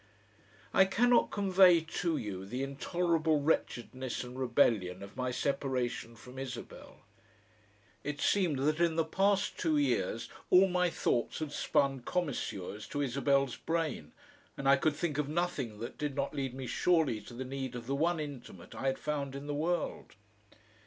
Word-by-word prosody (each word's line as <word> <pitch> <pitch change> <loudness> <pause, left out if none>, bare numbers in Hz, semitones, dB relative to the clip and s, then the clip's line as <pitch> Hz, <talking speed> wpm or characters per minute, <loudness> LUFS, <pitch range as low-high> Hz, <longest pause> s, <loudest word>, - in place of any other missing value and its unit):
I 190 - +6
cannot 240 +5 +3
convey 190 -4 +5
to 160 0 -2
you 95 -3 -4
the 125 +7 -4
intolerable 160 +2 +1
wretchedness 130 -4 -1
and 125 0 -9
rebellion 115 -8 +2
of 100 - -11
my 125 0 -1
separation 125 -3 -2
from 125 +3 -11
Isabel. 135 -2 -8 1.0
It 145 0 -4
seemed 180 -8 +2
that 155 +2 +1
in 170 -2 +2
the 165 -1 +2
past 195 +4 +1
two 315 -2 +2
years 295 - 0 0.2
all 185 +2 +7
my 180 -1 +2
thoughts 120 -7 0
had 155 -2 -4
spun 140 -2 +1
commisures 120 - -3
to 145 - -2
Isabel's 140 0 +1
brain 160 - -2 0.5
and 135 - -2
I 135 - +8
could 150 +3 +1
think 155 -2 -2
of 145 -1 -1
nothing 150 -9 -2
that 115 - -6
did 150 -2 -2
not 140 -1 -1
lead 135 -2 -3
me 135 -1 -5
surely 155 -4 +2
to 120 - -11
the 130 +2 -5
need 130 -1 -4
of 120 -1 -6
the 135 - -2
one 165 +4 +1
intimate 135 - -8
I 135 - -3
had 135 - +1
found 140 -3 -3
in 140 +1 -6
the 145 - -3
world. 170 +4 -2
140 Hz, 165 wpm, -32 LUFS, 130-170 Hz, 1.0 s, I